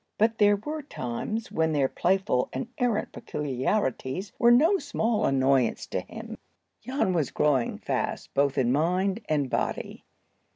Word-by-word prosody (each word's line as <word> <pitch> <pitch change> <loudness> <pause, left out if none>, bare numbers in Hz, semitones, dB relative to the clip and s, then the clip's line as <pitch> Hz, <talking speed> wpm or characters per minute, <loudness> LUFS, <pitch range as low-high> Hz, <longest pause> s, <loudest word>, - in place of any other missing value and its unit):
But 225 +1 +2
there 205 -1 +6
were 300 +10 -5
times 215 - -4
when 160 0 +1
their 140 -3 +2
playful 180 -6 +1
and 130 - -3
errant 240 -4 0
peculiarities 140 - -2
were 235 - +6
no 320 +11 +5
small 235 -7 0
annoyance 135 -2 +2
to - - -3
him. - - -9 0.4
Jan 255 -5 0
was 160 -5 0
growing 135 -5 +1
fast - - -3
both 140 0 +1
in 125 -2 +2
mind 180 - +1
and 145 -3 +1
body. - - -3
175 Hz, 140 wpm, -27 LUFS, 135-220 Hz, 0.4 s, there